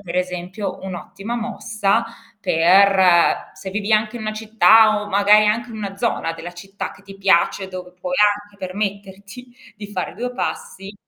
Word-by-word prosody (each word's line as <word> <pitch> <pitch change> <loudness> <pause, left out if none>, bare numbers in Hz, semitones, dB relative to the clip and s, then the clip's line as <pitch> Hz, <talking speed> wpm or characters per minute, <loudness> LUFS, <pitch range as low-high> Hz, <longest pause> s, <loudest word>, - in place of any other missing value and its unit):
per 175 -3 -8
esempio, 180 +2 -4
un'ottima 195 +4 -6
mossa 220 -1 -1 0.4
per 185 0 +4
se 190 - -8
vivi 205 +2 -2
anche 215 +2 +1
in 230 - -7
una 215 0 -3
città 215 0 +4
o 210 - -8
magari 205 +1 +5
anche 235 +3 0
in 220 - -8
una 200 -2 -6
zona 210 -6 -1
della 170 +1 -9
città 195 +3 -7
che 205 - -18
ti 195 0 -12
piace 190 0 +2
dove 180 -1 -9
puoi 270 +7 -4
anche 205 0 +1
permetterti 200 +4 -6 0.2
di 205 0 -8
fare 185 -3 -4
2 245 +4 -4
passi 200 -5 -5
200 Hz, 160 wpm, -20 LUFS, 185-215 Hz, 0.4 s, magari